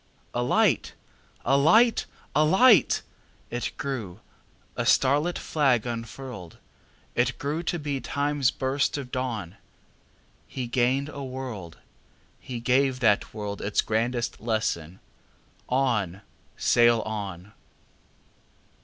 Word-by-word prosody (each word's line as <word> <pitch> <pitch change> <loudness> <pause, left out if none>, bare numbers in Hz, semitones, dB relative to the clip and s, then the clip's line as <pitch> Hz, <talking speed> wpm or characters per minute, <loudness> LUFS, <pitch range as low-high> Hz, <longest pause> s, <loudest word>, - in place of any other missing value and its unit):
A 120 - 0
light! 120 - +2 0.5
A 135 - +3
light! 210 +12 +4 0.3
A 150 - +5
light! 190 - +5 0.5
It 120 +1 -2
grew, 110 -9 -4 0.6
a - - -1
starlit 145 +6 +3
flag 135 -7 +1
unfurled! 115 -5 -7 0.6
It - - +1
grew 150 +4 -2
to 175 0 -2
be 145 -4 -3
Time's 145 -2 0
burst 135 +2 -1
of 130 -3 -7
dawn. 115 -8 -3 0.9
He 130 - -4
gained 130 +3 +1
a 140 -2 -7
world; 125 -10 -6 0.6
he 125 -2 -6
gave 130 +2 +2
that 105 -4 +3
worldIts 105 -1 -2
grandest 120 +2 -1
lesson: 100 -7 -2 0.7
"On! 115 -8 0 0.4
sail 120 -1 +4
on!" 100 -3 -6
125 Hz, 105 wpm, -26 LUFS, 110-140 Hz, 0.9 s, A